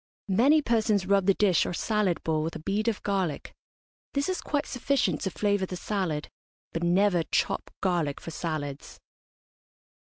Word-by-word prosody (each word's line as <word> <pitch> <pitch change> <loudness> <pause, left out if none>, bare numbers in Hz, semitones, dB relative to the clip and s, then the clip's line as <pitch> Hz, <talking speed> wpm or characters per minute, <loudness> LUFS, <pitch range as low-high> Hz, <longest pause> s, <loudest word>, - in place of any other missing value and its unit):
Many 285 +9 +5
persons 220 -5 +2
rub 195 0 +2
the 195 - +5
dish 190 -5 +3
or - - -3
salad 210 -5 0
bowl 155 -1 0
with 160 +2 -3
a - - -5
bead 200 +7 -1
of 225 -3 -1
garlic. 190 -6 -2 0.6
This 280 +4 0
is 370 - -1
quite 290 -1 -1
sufficient 250 - 0
to - - -1
flavour 200 0 0
the 180 - -5
salad; 175 -6 -2 0.5
but 165 - -2
never 180 +1 +3
chop - - -1
garlic 170 -7 0
for 165 - -8
salads. 150 -4 -5
190 Hz, 160 wpm, -27 LUFS, 165-215 Hz, 0.6 s, Many